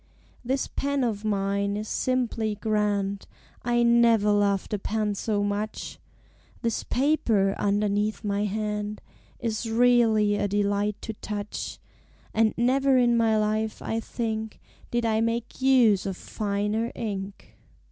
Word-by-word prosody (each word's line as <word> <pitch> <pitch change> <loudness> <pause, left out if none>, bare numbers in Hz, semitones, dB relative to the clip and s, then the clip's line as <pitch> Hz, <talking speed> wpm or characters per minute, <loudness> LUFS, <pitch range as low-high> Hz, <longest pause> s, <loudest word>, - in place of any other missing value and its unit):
_" - - -35 0.4
This 265 +2 0
Pen 280 -1 -1
of 220 -3 -1
mine 200 -1 0
is 215 +1 -4
simply 235 -4 -1
grand, 205 -2 -1 0.3
I 240 0 +2
never 235 -3 +4
loved 200 -1 +1
a 210 - 0
pen 210 +1 -1
so 205 0 -1
much; 205 +1 -3 0.6
This 230 -2 -1
Paper 235 -8 +2
(underneath 205 +1 0
my 205 0 0
hand) 210 0 -3 0.4
Is 225 -1 -2
really 225 -3 +4
a 205 - 0
delight 205 0 0
to 220 - -4
touch; 210 0 -5 0.6
And 220 0 +2
never 265 +3 +3
in 240 -1 +4
my 225 -2 +3
life, 215 +1 0
I 225 - -2
think, 220 -1 -4 0.3
Did 240 -1 0
I 220 -1 +2
make 230 +2 -2
use 240 -8 +4
of 190 -2 -4
finer 210 +2 -2
ink. 200 -3 -6
215 Hz, 135 wpm, -26 LUFS, 205-235 Hz, 0.6 s, never